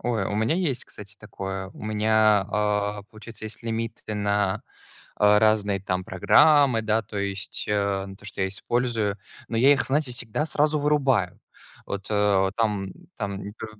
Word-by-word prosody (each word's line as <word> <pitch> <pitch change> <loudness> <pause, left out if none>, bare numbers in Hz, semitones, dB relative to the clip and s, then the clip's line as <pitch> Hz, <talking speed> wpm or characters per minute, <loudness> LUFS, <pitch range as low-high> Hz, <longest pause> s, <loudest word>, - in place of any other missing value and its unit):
Ой, 115 -5 -1
у 105 - -3
меня 110 +8 +1
есть, 165 -8 -1
кстати, 100 -1 -11
такое. 95 -2 -6
У - - -12
меня, 110 -1 +3
а, 105 0 0
получается, 110 0 -9
есть 115 +2 -9
лимиты 115 -1 -4
на, 100 -1 0 0.5
а, 105 0 +5
разные 105 -3 +2
там 95 -1 -2
программы, 130 - +4
да, 110 +1 +1
то 105 0 -7
есть, 100 0 -4
а, 100 -1 0
на 95 - -9
то, 100 - -20
что 100 - -6
я 95 - +1
использую. 105 0 -1 0.3
Но 115 - -3
я 135 +5 +6
их, 140 - +1
знаете, 140 -2 0
всегда 120 +5 -2
сразу 150 0 +1
вырубаю. 135 -10 +1 0.5
Вот, 100 0 -5
э, 105 -2 +3
вот 95 0 +1
там 105 -4 -1 0.2
там 100 -3 -4
не 100 - -7
п 110 - -8
105 Hz, 175 wpm, -25 LUFS, 100-115 Hz, 0.5 s, я